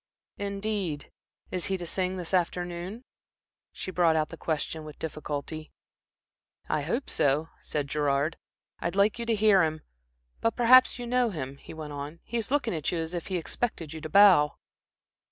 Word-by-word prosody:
"Indeed. 200 -6 -2 0.4
Is 180 -2 0
he 190 - 0
to 175 - -6
sing 185 +2 -1
this 180 0 -5
afternoon?" 180 +4 -1 0.7
She 185 - -6
brought 170 -3 +3
out 155 -1 +1
the - - -7
question 160 0 -2
with 150 -1 -10
difficulty. 155 0 -5 1.0
"I 150 - 0
hope 235 - -2
so," 145 +3 +2
said 145 -2 -2
Gerard. 145 +2 0 0.4
"I'd 170 +2 -2
like 205 +3 +3
you 235 - -3
to 230 - +3
hear 210 -2 +5
him. 155 -1 0 0.6
But 230 - +1
perhaps 255 +2 +6
you 245 - -5
know 245 0 +2
him," 140 -7 -5
he 160 - -11
went 155 -2 -6
on. 145 +3 -6
"He 235 - -3
is 230 - -2
looking 275 -6 +1
at 155 -3 -1
you 175 - -1
as 165 +1 -3
if 175 -2 -4
he 185 - -1
expected 165 -2 -3
you 160 - -7
to 155 - -6
bow." 185 -7 +7
170 Hz, 175 wpm, -28 LUFS, 155-205 Hz, 1.0 s, bow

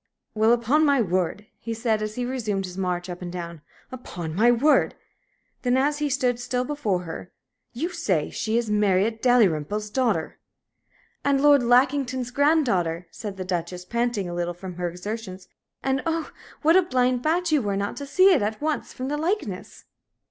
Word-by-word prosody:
"Well, 220 +1 +3
upon 240 +6 +3
my 285 -3 +4
word," 185 0 -1
he 230 -1 -5
said, 220 -2 0
as 215 0 -4
he 245 - -2
resumed 220 -7 -2
his 180 -1 -8
march 180 -1 -2
up 180 0 -7
and 175 -1 -5
down 170 -3 -6 0.3
"upon 175 -10 -6
my 225 +7 +4
word!" 275 +6 +3 0.7
Then, 250 0 +2
as 290 +2 +1
he 295 -1 0
stood 250 -3 0
still 250 +1 -2
before 225 -11 -1
her, 165 +1 -8 0.4
"You 305 +9 -2
say 210 - -1
she 220 +1 -1
is 235 -1 0
Marriott 210 +1 +1
Dalrymple's 210 - +2
daughter?" 220 -10 0 0.8
"And 280 -1 +2
Lord 290 -1 +6
Lackington's 255 0 +2
granddaughter." 240 - +2
said 205 -3 -7
the 185 - -4
Duchess, 180 0 -3
panting 235 -2 -1
a 175 - -5
little 175 0 -2
from 180 0 -8
her 175 -1 -1
exertions. 190 +1 -7 0.4
"And, 265 0 0
oh, 325 -1 -2 0.3
what 320 +3 +5
a 375 - +7
blind 255 -7 +1
bat 335 +4 +1
you 300 -3 +3
were 200 -3 -1
not 200 0 -2
to 280 - -6
see 370 +7 +5
it 295 - +2
at 215 +1 -2
once 305 0 -2
from 255 - -5
the 295 +2 -2
likeness!" 310 - -3
230 Hz, 180 wpm, -24 LUFS, 185-270 Hz, 0.8 s, a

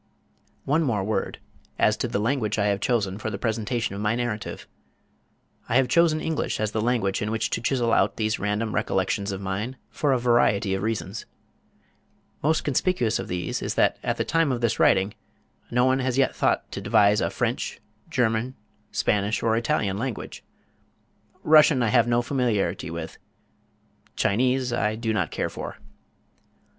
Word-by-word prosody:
One 150 +2 +2
word 105 -6 0
more 110 - -1 0.5
as - - +3
to - - -1
the - - -2
language 110 -1 0
I 100 - +1
have 100 -1 0
chosen 100 -4 0
for 110 - -3
the 100 - -4
presentation 115 0 -2
of 100 - -5
my 105 +2 +1
narrative. 120 -3 -4 1.0
I - - 0
have 130 0 +4
chosen 160 +2 +3
English 160 0 -2
as 110 -1 -1
the 110 - -1
language 110 -5 0
in 105 - -1
which 110 0 -1
to - - -1
chisel 120 -2 +1
out - - +2
these 110 0 0
random 105 +3 -1
recollections 100 -1 0
of 95 0 -5
mine 100 +7 -3
for 145 - 0
a 130 - +3
variety 120 -4 +2
of 95 - -1
reasons. 110 -1 -3 1.1
Most 155 +2 +1
conspicuous 145 -4 +1
of - - -5
these 90 -1 -3
is - - -3
that - - +2
at - - -1
the - - -1
time 165 -3 +2
of 125 - -1
this 115 -1 0
writing 95 +2 +3 0.6
no 125 +1 +2
one 130 +1 +2
has 130 -1 -1
as - - -3
yet 135 - +2
thought - - 0
to - - -5
devise 105 0 +4
a - - +1
French, - - -2 0.3
German, 120 +1 0 0.4
Spanish 105 +1 0
or 110 -1 +2
Italian 110 -5 0
language. 125 -1 -5 1.0
Russian 150 -4 +6
I 115 - +2
have 120 0 +4
no 120 0 +2
familiarity 110 - -1
with. 85 -1 -7 1.0
Chinese 125 +3 +1
I 110 -2 0
do 110 0 -2
not - - 0
care - - -3
for. - - -7
115 Hz, 170 wpm, -25 LUFS, 105-125 Hz, 1.1 s, Russian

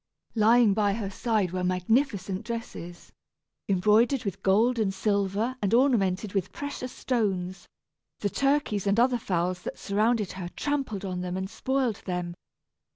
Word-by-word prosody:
Lying 225 -1 +5
by 205 -1 +2
her 200 -2 -3
side 210 -4 0
were 185 0 -2
magnificent 190 +1 0
dresses, 220 -7 -7 0.6
embroidered 215 +7 +3
with 200 -1 -4
gold 225 +5 +3
and 205 -3 +1
silver 200 +4 0
and 205 +2 +2
ornamented 210 -7 +2
with 195 -2 -1
precious 285 -3 -5
stones; 195 -7 -2 0.5
the 205 - +1
turkeys 275 -8 +1
and 200 +3 +3
other 245 0 +3
fowls 180 -2 -1
that - - -6
surrounded 215 0 +1
her 180 -2 -6
trampled 275 -9 -2
on 180 -1 -3
them 180 0 -3
and 190 +2 -4
spoiled 260 -5 0
them. 180 -1 -2
205 Hz, 145 wpm, -27 LUFS, 185-235 Hz, 0.6 s, Lying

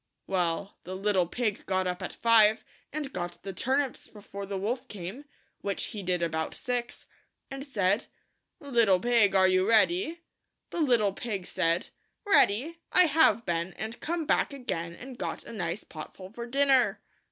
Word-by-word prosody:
Well, 180 +1 -1
the 185 +2 -6
little 190 -2 +1
pig 220 +1 -2
got 185 0 +1
up 180 +1 -2
at 185 - -4
five, 220 -2 +4 0.3
and 290 -2 -4
got 175 -1 -5
the 195 - -5
turnips 265 +3 -1
before 200 -1 -9
the 200 0 -3
wolf 240 +7 -2
came 205 +8 -7 0.2
— - - -41
which 200 -1 -2
he 210 - -5
did 180 -2 0
about 160 -1 -2
six 245 -1 -3 0.2
— - - -51
and 270 0 -5
said, 205 -6 0 0.3
" - - -52
Little 235 -9 +3
pig 230 -3 +3
are 190 -1 +6
you 185 +2 +2
ready?" 335 - +3 0.5
The 340 - -2
little 235 -9 +3
pig 200 -4 -4
said, 170 -1 +1 0.2
" - - -50
Ready? 325 - +3
I 365 - +7
have 295 - +4
been, 170 +1 -1
and 220 +2 -6
come 335 0 -2
back 285 - +1
again, 170 -11 -4
and 250 +4 -10
got - - -4
a - - -10
nice 180 -1 -3
potful 185 +5 -10
for 235 +1 -6
dinner." 270 0 +3
210 Hz, 175 wpm, -29 LUFS, 185-255 Hz, 0.5 s, I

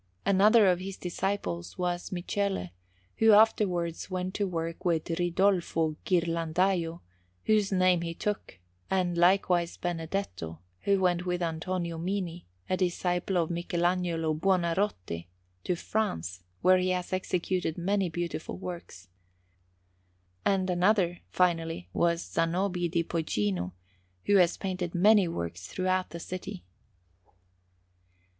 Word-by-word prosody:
Another 205 +3 +6
of 180 -2 +3
his 195 +1 -6
disciples 170 - -3
was 175 -1 -2
Michele, 190 - -2 0.5
who 225 -1 +6
afterwards 190 -6 +3
went 185 0 -3
to 205 -1 0
work 165 -1 -4
with 165 -4 +1
Ridolfo 175 -2 +1
Ghirlandajo, 170 0 +1 0.4
whose 210 -2 +3
name 185 -2 +3
he 165 -1 -4
took; 210 - -3 0.3
and 180 -2 +1
likewise 175 -1 +3
Benedetto, 165 - -3 0.3
who 200 -1 +3
went 180 -1 +1
with 180 0 0
Antonio 170 +1 -2
Mini, 180 -1 -3 0.2
a 185 - +1
disciple 180 0 0
of 170 -1 +1
Michelagnolo 175 -1 0
Buonarroti, 170 - 0 0.4
to 180 - 0
France, 90 - -2 0.2
where 185 0 +6
he 185 0 0
has 180 0 -2
executed 180 -2 -1
many 190 +1 +1
beautiful 170 -1 -4
works. 170 - -8 1.4
And 190 -2 +2
another, 180 -1 +2
finally, 165 - 0
was 170 0 +1
Zanobi 175 +1 0
di 170 0 +1
Poggino, 105 - -1 0.5
who 205 - +5
has 180 -2 +4
painted 185 -3 -3
many 200 +1 +5
works 90 - -5
throughout 185 - 0
the 170 - -7
city. 180 - -6
175 Hz, 115 wpm, -29 LUFS, 165-185 Hz, 1.4 s, Another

